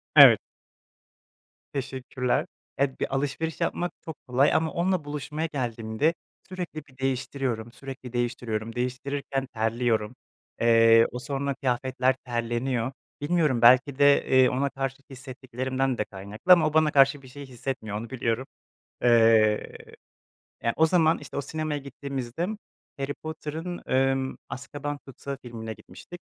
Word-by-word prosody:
Evet. - - +10 1.3
Teşekkürler. 130 -2 -2 0.3
Ya, 135 -1 0
bir - - -2
alışveriş 145 +4 -2
yapmak 175 +1 -1
çok 160 -2 -6
kolay 130 +3 +3
ama 160 0 +2
onunla 180 -2 0
buluşmaya 150 +2 -3
geldiğimde 120 +2 -1 0.4
sürekli 175 -5 -6
bir 130 -2 -22
değiştiriyorum, 130 -3 -2
sürekli 130 -2 -9
değiştiriyorum, 115 -2 -2
değiştirirken 135 +2 -2
terliyorum. 115 0 0 0.5
Eee, 115 0 +6
o 125 - -5
sonra 140 +1 -2
kıyafetler 130 0 0
terleniyor. 120 +1 -1 0.3
Bilmiyorum 150 -5 +1
belki 130 +3 +6
de, 145 0 +5
eee, 130 -1 +6
ona 140 +2 0
karşı 135 -1 -3
hissettiklerimden 130 0 -3
de 105 - -1
kaynaklı 100 - +2
ama 165 -3 +4
o 155 - -3
bana 155 -1 +4
karşı 140 0 +5
bir 130 - -14
şey 140 +2 -9
hissetmiyor 125 -4 -5
onu 115 +2 -6
biliyorum. 125 0 -1 0.6
Eee, 115 -3 +4 0.9
yani, 115 - +1
o 160 - +5
zaman, 160 -1 +3
işte, - - -9
o 140 - +1
sinemaya 155 +1 -3
gittiğimizde 140 +1 -4 0.5
Harry 140 +1 -2
Potter'ın, 160 +3 -6
emm, 135 0 +1
Azkaban 145 +2 -5
Tutsağı 135 +1 -7
filmine 115 -2 -6
gitmiştik. 175 +9 -12
135 Hz, 130 wpm, -26 LUFS, 120-145 Hz, 1.3 s, Evet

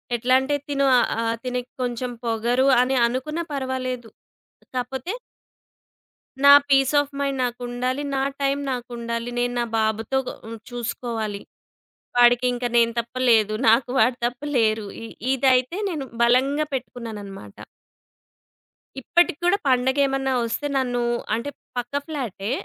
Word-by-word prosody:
ఎట్లా 245 +2 +1
అంటే 275 +2 -1
తిను 275 -1 +1
ఆహ్, 230 -1 +1
తినకీ 250 0 -3
కొంచెం 245 0 -2
పొగరు 235 +4 +1
అని 260 +1 +1
అనుకున్నా 305 +7 -3
పర్వాలేదు. 255 -3 -3 0.7
కాపోతే 260 - -3 1.3
నా 280 - +9 0.2
పీస్ 270 +1 +4
ఆఫ్ 290 0 -2
మైండ్ 275 -1 -1
నాకుండాలి. 245 +2 -2
నా 270 - +1 0.2
టైం 275 +1 +1
నాకుండాలి. 235 -1 -4
నేను 245 0 0
నా 240 - +1
బాబుతో 220 +4 0 0.5
చూసుకోవాలి. 230 -3 -4 0.8
వాడికి 245 +1 +5
ఇంకా 245 0 -2
నేను 230 0 +4
తప్ప 235 +2 -6
లేరు. 215 -2 +4
నాకు 235 +2 +3
వాడు 245 +2 +3
తప్ప 245 +2 -3 0.2
లేరు. 220 -2 +2 0.2
ఇ - - -6 0.3
ఇదైతే 260 +4 +2
నేను 300 -7 -4 0.2
బలంగా 270 +5 +3
పెట్టుకున్నానన్నమాట. 210 - -7 1.5
ఇప్పటికీ 345 +2 +2
కూడా, 385 +3 +4
పండగేమన్నా 265 +1 +2
వస్తే 290 +6 -2
నన్ను 245 -2 0 0.3
అంటే 235 +5 -4 0.3
పక్క 245 +2 -4
ఫ్లాటే. 235 -9 -4
250 Hz, 120 wpm, -23 LUFS, 235-270 Hz, 1.5 s, నా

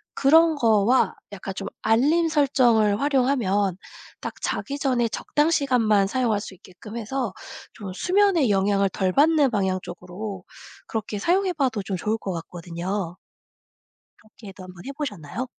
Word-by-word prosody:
그런 320 +3 +5
거와 230 -1 +3 0.2
약간 195 -1 -6
좀 - - -5
알림 295 +10 +3
설정을 240 -8 +3
활용하면 245 -9 +1 0.4
딱 - - -5
자기 280 +1 -3
전에 250 -5 +1
적당 295 +7 0
시간만 230 -9 +2
사용할 230 -2 0
수 200 - -8
있게끔 185 +5 -13
해서 235 -2 -3 0.4
좀 200 -3 -8
수면에 360 - +2
영향을 195 0 +2
덜 185 0 -1
받는 295 - +4
방향 190 -3 0
쪽으로 185 +2 -7 0.4
그렇게 215 -1 -4
사용해 365 - +1
봐도 255 -9 0
좀 190 -1 -3
좋을 215 +5 -1
것 195 -4 -5
같거든요. 175 +2 -5 1.0
그렇게도 205 -3 -13
1 185 0 -11
번 175 - -13
해 275 - -5
보셨나요? 245 - -5
220 Hz, 290 characters per minute, -24 LUFS, 195-275 Hz, 1.0 s, 그런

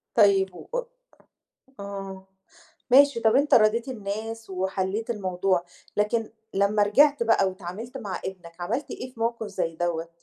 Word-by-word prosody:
طيب 195 -4 +4
و - - -11 1.1
آه، 195 -1 -7 0.6
ماشي 275 -2 +6
طب 225 +2 +4
أنت 285 +2 +4
راضيت 230 +2 +4
الناس 225 -1 -5
وحليت 190 +4 -2
الموضوع، 185 -3 0 0.3
لكن 215 +2 0 0.2
لمّا 200 +1 +3
رجِعت 285 +6 +4
بقى 225 -4 +3
واتعاملت 195 +7 -7
مع 200 -6 -5
ابنك، 175 -2 -8
عملت 235 +11 -2
إيه 250 0 -6
في 225 - -14
موقف 230 -1 -1
زي 165 -5 -3
دَوَّة؟ 170 -1 -2
205 Hz, 135 wpm, -26 LUFS, 190-230 Hz, 1.1 s, ماشي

